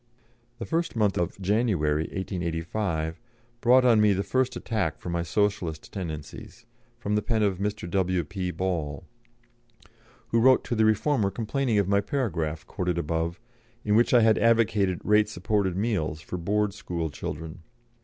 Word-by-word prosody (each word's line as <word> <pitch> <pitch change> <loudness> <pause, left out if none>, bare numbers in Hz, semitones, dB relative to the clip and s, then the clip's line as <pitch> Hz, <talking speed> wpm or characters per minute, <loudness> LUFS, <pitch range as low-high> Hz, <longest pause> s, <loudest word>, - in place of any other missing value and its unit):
This 115 - -6
first 165 -2 -1
month 105 -4 +2
of 85 +2 -2
January, 95 -7 +1
1885, 85 -2 -3 0.4
brought 125 +1 +5
on 115 -3 +5
me 105 -1 +5
the 100 +1 -1
first 130 +2 0
attack 95 -9 -2
for - - -7
my 85 0 0
Socialistic 85 -2 -1
tendencies, 80 -6 -7 0.3
from 105 - -3
the 105 - +2
pen 110 0 0
of 95 -3 0
Mr. 105 -1 -3
W.P. 90 0 -1
Ball, 90 -4 -3 1.3
who 115 - +2
wrote 130 +2 +5
to - - -3
the 110 -1 +3
Reformer 110 0 +2
complaining 115 +2 -1
of 100 -2 +2
my 100 0 +3
paragraph, 85 - -2
quoted 90 -2 -2
above, 85 +2 -2 0.5
in 105 - +2
which 120 +2 +4
I 120 - +6
had 110 -1 +4
advocated 105 -5 +2
rate 105 0 +3
supported 95 -1 -1
meals 95 -8 -1
for 90 - -6
Board 105 +3 0
School 85 -6 -4
children. 80 +3 -6
100 Hz, 155 wpm, -26 LUFS, 85-110 Hz, 1.3 s, I